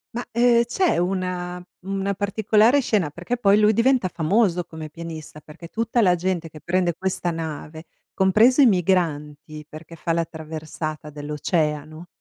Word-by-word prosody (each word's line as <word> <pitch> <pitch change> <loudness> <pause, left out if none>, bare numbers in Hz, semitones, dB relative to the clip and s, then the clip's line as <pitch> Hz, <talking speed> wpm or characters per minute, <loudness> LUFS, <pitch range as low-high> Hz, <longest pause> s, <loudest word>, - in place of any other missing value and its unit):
Ma, 240 - -3
ehm, 235 0 +4
c’è 335 +10 +1
una 180 0 -2 0.2
una 195 +1 -2
particolare 215 +6 +3
scena, 205 - 0
perché 175 +11 -4
poi 205 -3 +4
lui 210 0 +5
diventa 235 -2 +2
famoso 180 +1 +1
come 160 -2 -9
pianista, 160 -1 -9
perché 155 +3 -12
tutta 230 +3 0
la 180 -4 +4
gente 175 -2 -2
che 155 - -12
prende 175 +2 0
questa 185 -2 -2
nave, 160 0 -6 0.3
compreso 215 +8 +4
i - - +8
migranti, 155 - 0
perché 160 +2 -11
fa 165 +1 -3
la 165 0 +1
traversata 155 -1 -6
dell’oceano, 150 +2 -3
175 Hz, 145 wpm, -23 LUFS, 155-205 Hz, 0.3 s, i